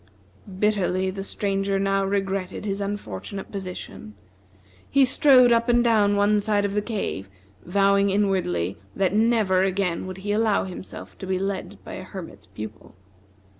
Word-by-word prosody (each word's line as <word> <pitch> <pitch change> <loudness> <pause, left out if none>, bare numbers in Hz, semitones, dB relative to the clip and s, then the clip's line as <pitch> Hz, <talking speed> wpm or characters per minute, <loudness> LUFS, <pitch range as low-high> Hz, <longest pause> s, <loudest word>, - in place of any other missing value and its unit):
Bitterly 190 -2 +1
the 195 +1 -5
Stranger 195 0 -1
now 195 0 +1
regretted 195 -1 -2
his 200 0 -2
unfortunate 200 - -5
position. 185 - -7 0.7
He 275 -1 +5
strode 255 -1 +6
up 235 +1 +3
and 240 0 +4
down 210 -4 +3
one 205 +1 +3
side 205 0 +1
of 200 - -2
the 210 - +1
cave, 200 - -4 0.4
vowing 200 +2 +3
inwardly 185 - 0 0.2
that 190 -1 +1
never 215 -4 +3
again 190 -2 0
would 185 0 -6
he 205 - 0
allow 215 -1 +2
himself 185 0 -8
to 190 - -6
be 190 0 0
led 195 0 -3
by - - -9
a 185 - -6
Hermit's 185 -2 -10
Pupil. 110 -3 -9
195 Hz, 150 wpm, -24 LUFS, 185-210 Hz, 0.7 s, strode